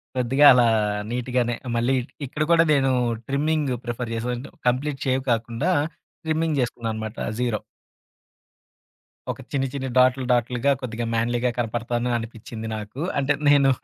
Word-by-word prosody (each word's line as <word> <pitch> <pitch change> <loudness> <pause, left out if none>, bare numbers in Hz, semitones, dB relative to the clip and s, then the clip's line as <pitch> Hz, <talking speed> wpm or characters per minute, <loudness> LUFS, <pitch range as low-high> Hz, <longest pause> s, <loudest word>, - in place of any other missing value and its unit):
కొద్దిగా 130 +3 +3
అలా 125 -1 +5 0.4
నీటుగానే 120 0 0 0.2
మళ్ళీ 120 +3 +2
ఇట్ 120 - -12
ఇక్కడ 150 +4 -2
కూడా 165 0 +6
నేను 135 -2 +3 0.4
ట్రిమ్మింగ్ 145 0 0
ప్రిఫర్ 120 0 -4
చేసే 115 +1 -3
వ - - 0
అంటే, 130 - -8 0.2
కంప్లీట్ 135 +3 0
షేవ్ 130 0 +1
కాకుండా, 115 +9 0 0.5
ట్రిమ్మింగ్ 160 -1 0
చేసుకున్నానన్నమాట 110 -2 -3 0.2
జీరో. 120 -4 0 1.7
ఒక - - -5
చిన్ని 135 -1 0
చిన్ని 135 -1 -3
డాట్లు 130 +1 +4
డాట్లుగా 125 +2 +1
కొద్దిగా 120 -2 -4
మ్యాన్‌లీ‌గా 120 +2 +1
కనపడతాను 120 +1 -1
అనిపిచ్చింది 115 0 -7
నాకు. 105 +5 -7 0.2
అంటే 140 +2 +2 0.2
నేను 140 -2 +5
125 Hz, 135 wpm, -24 LUFS, 115-135 Hz, 1.7 s, కూడా